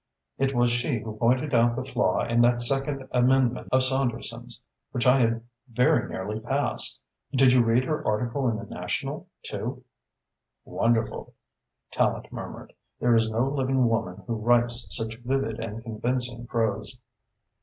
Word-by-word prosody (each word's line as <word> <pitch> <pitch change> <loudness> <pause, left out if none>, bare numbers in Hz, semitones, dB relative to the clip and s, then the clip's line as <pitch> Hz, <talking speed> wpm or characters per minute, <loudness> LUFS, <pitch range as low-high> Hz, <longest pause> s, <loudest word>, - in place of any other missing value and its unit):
It 135 0 +1
was 120 0 +3
she 120 +2 0
who 110 0 -6
pointed 130 +6 +1
out 120 0 +4
the - - -4
flaw - - +1
in 115 0 +2
that 120 0 +4
second 135 +1 0
amendment 125 0 +2
of 130 0 +4
Saunderson's, 130 -2 -1 0.3
which 120 - -2
I 130 +1 +6
had 115 -1 +1 0.3
very 125 +7 +2
nearly 105 +3 -4
passed. 130 +2 0 0.3
Did 130 -2 +5
you 125 - +6
read 115 +2 +3
her 150 +3 -2
article 120 +4 0
in 110 - -1
the 115 - -7
National, - - -4 0.2
too?" - - -5 0.8
"Wonderful!" 115 -1 -1 0.6
Tallente - - 0
murmured. - - -8 0.3
"There 120 -1 +3
is 115 -1 +3
no 115 +4 +1
living 135 -2 +1
woman 110 -6 -2
who 115 -2 -2
writes 120 0 +2
such 110 +4 -2
vivid 125 -2 -2
and 115 0 -6
convincing 120 +1 -3
prose." 110 +1 -1
120 Hz, 150 wpm, -26 LUFS, 115-130 Hz, 0.8 s, I